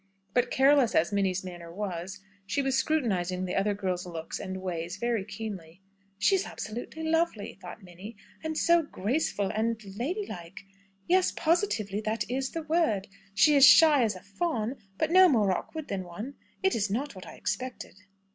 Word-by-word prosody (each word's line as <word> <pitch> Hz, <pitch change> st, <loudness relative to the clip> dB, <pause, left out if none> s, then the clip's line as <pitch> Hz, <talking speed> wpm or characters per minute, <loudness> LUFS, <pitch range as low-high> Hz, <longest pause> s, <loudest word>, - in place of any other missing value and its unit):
But 245 Hz, 0 st, +2 dB
careless 270 Hz, -2 st, +4 dB
as 170 Hz, -, +3 dB
Minnie's 195 Hz, -2 st, +1 dB
manner 175 Hz, -2 st, -8 dB
was, 190 Hz, 0 st, -5 dB, 0.3 s
she 275 Hz, +9 st, 0 dB
was 270 Hz, -1 st, +1 dB
scrutinising 185 Hz, -, 0 dB
the 180 Hz, -, -3 dB
other 200 Hz, +1 st, +1 dB
girl's 185 Hz, -3 st, -2 dB
looks 165 Hz, -2 st, -6 dB
and 190 Hz, -1 st, -5 dB
ways 175 Hz, -1 st, -4 dB
very 235 Hz, -2 st, 0 dB
keenly. 190 Hz, -6 st, -7 dB, 0.4 s
"She 300 Hz, -, +3 dB
is 385 Hz, 0 st, +1 dB
absolutely 240 Hz, +9 st, -6 dB
lovely!" 325 Hz, -9 st, -1 dB
thought 180 Hz, +4 st, -10 dB
Minnie, 190 Hz, +5 st, -11 dB, 0.3 s
"And 315 Hz, -1 st, -3 dB
so 340 Hz, 0 st, +4 dB
graceful, 215 Hz, -, -1 dB
and 225 Hz, +1 st, 0 dB
and 195 Hz, 0 st, -11 dB
lady 365 Hz, -, -2 dB
like! 170 Hz, -, -9 dB, 0.5 s
Yes; 370 Hz, +1 st, +3 dB
positively 310 Hz, -, 0 dB
that 220 Hz, +1 st, -2 dB
is 265 Hz, +1 st, -1 dB
the 330 Hz, -, -5 dB
word. 305 Hz, -, +1 dB, 0.3 s
She 300 Hz, +10 st, +6 dB
is 275 Hz, -, +6 dB
as -, -, +10 dB
shy 305 Hz, -4 st, +7 dB
as 215 Hz, -3 st, 0 dB
a 185 Hz, -, -10 dB
fawn, 235 Hz, -, -2 dB, 0.2 s
but -, -, 0 dB
no 370 Hz, 0 st, +8 dB
more 215 Hz, -, +3 dB
awkward 310 Hz, -, -4 dB
than 195 Hz, -2 st, -3 dB
one. 205 Hz, +10 st, -7 dB, 0.3 s
It 385 Hz, -, +3 dB
is 210 Hz, -2 st, 0 dB
not 260 Hz, +9 st, -2 dB
what 185 Hz, -2 st, -11 dB
I -, -, -9 dB
expected." 255 Hz, 0 st, -4 dB
215 Hz, 180 wpm, -28 LUFS, 190-285 Hz, 0.5 s, as